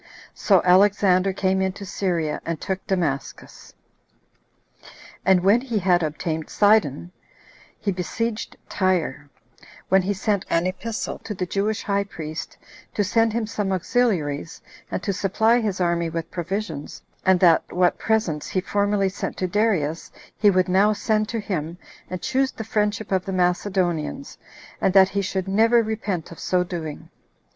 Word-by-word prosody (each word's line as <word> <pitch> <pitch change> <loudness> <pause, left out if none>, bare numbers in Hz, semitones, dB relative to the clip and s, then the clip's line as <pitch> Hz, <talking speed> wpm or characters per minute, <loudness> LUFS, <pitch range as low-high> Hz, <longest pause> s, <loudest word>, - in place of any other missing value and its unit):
So 195 -4 +3
Alexander 190 0 +4
came 190 0 0
into 190 +1 -2
Syria, 175 -5 -2
and 165 -2 -3
took 190 0 -4
Damascus; 150 -9 -3 1.5
and 185 -1 +4
when 205 +5 +5
he 245 -4 -2
had 180 -2 +3
obtained 155 0 -3
Sidon, 185 -6 +2 0.7
he 200 - -1
besieged 220 +5 -3
Tyre, 170 -7 -1 0.6
when 190 +1 +5
he 200 +2 -1
sent 200 0 0
an 170 +1 +2
epistle 205 +5 -4
to 210 - -6
the 180 - -2
Jewish 205 +4 -1
high 200 0 0
priest, 160 -4 -7 0.4
to 205 - +2
send 225 +3 +2
him 230 -1 -1
some 210 -2 -2
auxiliaries, 180 - 0 0.3
and - - -4
to 200 - -1
supply 220 +5 +2
his 210 -5 -2
army 170 -1 +1
with 165 0 -5
provisions; 175 -4 -5 0.2
and 190 -1 +4
that 170 -3 +4
what 180 0 +2
presents 215 -9 0
he 185 - -1
formerly 200 +1 +1
sent 190 - -4
to 185 - -1
Darius, 180 -6 0 0.2
he 210 - +4
would 185 -1 +2
now 195 +3 +4
send 215 0 0
to 230 - -2
him, 170 -5 -4 0.3
and 185 0 -5
choose 265 0 +1
the 220 - -7
friendship 210 -1 -1
of 190 -1 +1
the 195 - -4
Macedonians, 180 - -1 0.4
and 190 - +1
that 190 -1 +7
he 200 - -1
should 190 -1 -3
never 225 +4 +4
repent 210 -7 -3
of 170 - -11
so 180 -1 +1
doing. 165 -4 -6
190 Hz, 150 wpm, -23 LUFS, 175-210 Hz, 1.5 s, that